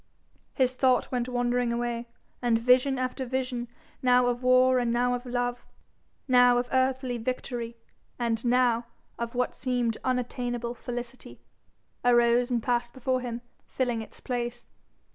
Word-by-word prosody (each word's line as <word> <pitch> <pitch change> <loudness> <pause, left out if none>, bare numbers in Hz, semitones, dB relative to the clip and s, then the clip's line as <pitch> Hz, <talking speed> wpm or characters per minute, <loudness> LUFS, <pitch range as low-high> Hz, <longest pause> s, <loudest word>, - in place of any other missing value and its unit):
His 255 -1 +2
thought 255 0 +2
went 250 -1 -1
wandering 245 0 0
away, 235 0 -2 0.3
and 240 -2 +3
vision 255 +3 +3
after 255 +1 -2
vision, 255 -1 -2 0.3
now 250 -1 +4
of 245 0 0
war 255 0 +5
and 240 -1 0
now 245 +1 +2
of 245 +1 -4
love, 245 0 -2 0.6
now 245 -1 +6
of 245 0 0
earthly 260 -1 +1
victory 235 -1 -4 0.4
and 230 -2 -1
now 240 -1 +2 0.3
of 235 +1 -4
what 250 0 0
seemed 245 -3 -1
unattainable 245 -1 -2
felicity, 245 +1 -7 0.6
arose 240 0 +4
and 240 -3 0
passed 240 -1 0
before 255 0 -1
him, 240 -1 -5 0.3
filling 245 -3 -1
its 220 - -10
place. 240 -1 -4
245 Hz, 140 wpm, -27 LUFS, 240-255 Hz, 0.6 s, now